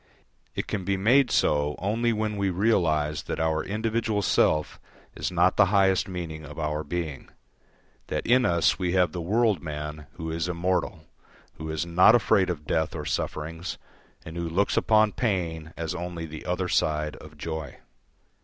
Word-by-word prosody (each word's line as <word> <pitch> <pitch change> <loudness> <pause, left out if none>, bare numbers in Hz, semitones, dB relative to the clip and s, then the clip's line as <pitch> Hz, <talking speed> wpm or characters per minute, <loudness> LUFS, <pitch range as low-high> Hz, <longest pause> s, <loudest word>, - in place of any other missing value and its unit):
It - - -2
can 100 - -3
be 100 +1 0
made 125 +7 +4
so 75 0 +2
only 115 +5 0
when 110 -1 -1
we 100 -1 0
realise 85 -7 +1
that - - -5
our 80 -1 +1
individual 110 0 -1
self 75 -4 +2 0.4
is - - -3
not 90 +1 +3
the - - +6
highest 95 -1 +3
meaning 85 -4 -6
of 75 0 -10
our 75 -1 -2
being, 80 -2 -4 0.8
that - - -3
in 125 +2 +4
us 85 -5 +2
we 90 -2 0
have 90 -1 +3
the 90 - -4
world 105 0 +2
man 75 -1 -6
who 80 -1 -5
is 85 +1 -2
immortal, 90 0 -1 0.6
who 80 0 -5
is 80 +1 -2
not 90 +6 +6
afraid 100 -5 +3
of 75 -4 -4
death 80 +2 0
or 75 -2 -5
sufferings, 80 +3 -3 0.5
and 80 - -8
who 85 -1 -2
looks 95 +5 +1
upon 110 -1 +4
pain 85 -9 -2
as 80 -1 -3
only 85 -1 -5
the 80 +2 -9
other 90 +1 -1
side 75 -2 0
of 75 0 -13
joy. 80 -2 -5
85 Hz, 170 wpm, -26 LUFS, 80-100 Hz, 0.8 s, the